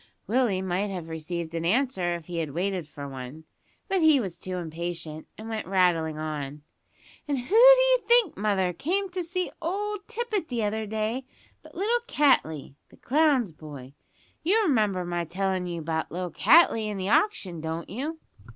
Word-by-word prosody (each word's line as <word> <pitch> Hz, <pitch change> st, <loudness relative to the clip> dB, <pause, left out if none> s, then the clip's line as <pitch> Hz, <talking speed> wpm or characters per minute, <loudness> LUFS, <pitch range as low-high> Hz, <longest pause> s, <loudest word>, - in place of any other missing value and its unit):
Willie 220 Hz, -4 st, +1 dB
might 190 Hz, +2 st, -1 dB
have 180 Hz, -5 st, -6 dB
received 160 Hz, +1 st, -4 dB
an 165 Hz, 0 st, -2 dB
answer 190 Hz, -3 st, +1 dB
if 170 Hz, -2 st, -8 dB
he 175 Hz, +1 st, -6 dB
had 155 Hz, -3 st, -4 dB
waited 185 Hz, -2 st, -1 dB
for 145 Hz, -1 st, -8 dB
one, 135 Hz, +3 st, -8 dB, 0.4 s
but 385 Hz, -3 st, +1 dB
he 310 Hz, -3 st, +6 dB
was 190 Hz, -8 st, -4 dB
too 185 Hz, -1 st, -4 dB
impatient, 165 Hz, -2 st, -5 dB
and 220 Hz, -, -8 dB
went 220 Hz, -1 st, -4 dB
rattling 175 Hz, -5 st, +2 dB
on. 150 Hz, -2 st, -5 dB, 0.6 s
"And 285 Hz, -2 st, 0 dB
who 250 Hz, -, -2 dB
d'ye -, -, +8 dB
think, 475 Hz, -7 st, +4 dB
mother, 195 Hz, -3 st, 0 dB
came 375 Hz, -, -1 dB
to 365 Hz, 0 st, -2 dB
see 360 Hz, +2 st, -2 dB
old 405 Hz, +4 st, -3 dB
Tippet 455 Hz, -6 st, -2 dB
the 235 Hz, -3 st, -2 dB
other 215 Hz, +1 st, -1 dB
day, 220 Hz, +4 st, -2 dB, 0.4 s
but -, -, -16 dB
little 435 Hz, +7 st, +1 dB
Cattley, 160 Hz, -, +2 dB, 0.2 s
the -, -, -19 dB
clown's 275 Hz, -, +2 dB
boy. 145 Hz, -4 st, -11 dB, 0.5 s
You 415 Hz, +7 st, +3 dB
remember 210 Hz, -, +1 dB
my 175 Hz, 0 st, -2 dB
tellin' 185 Hz, +2 st, -2 dB
you 170 Hz, -1 st, -4 dB
about 160 Hz, 0 st, -3 dB
little 180 Hz, 0 st, -4 dB
Cattley 260 Hz, -, +5 dB
and 205 Hz, -2 st, -4 dB
the 190 Hz, +1 st, -2 dB
auction, 195 Hz, -, +1 dB
don't 160 Hz, +1 st, -4 dB
you?" 285 Hz, -, -4 dB
195 Hz, 170 wpm, -27 LUFS, -, 0.6 s, d'ye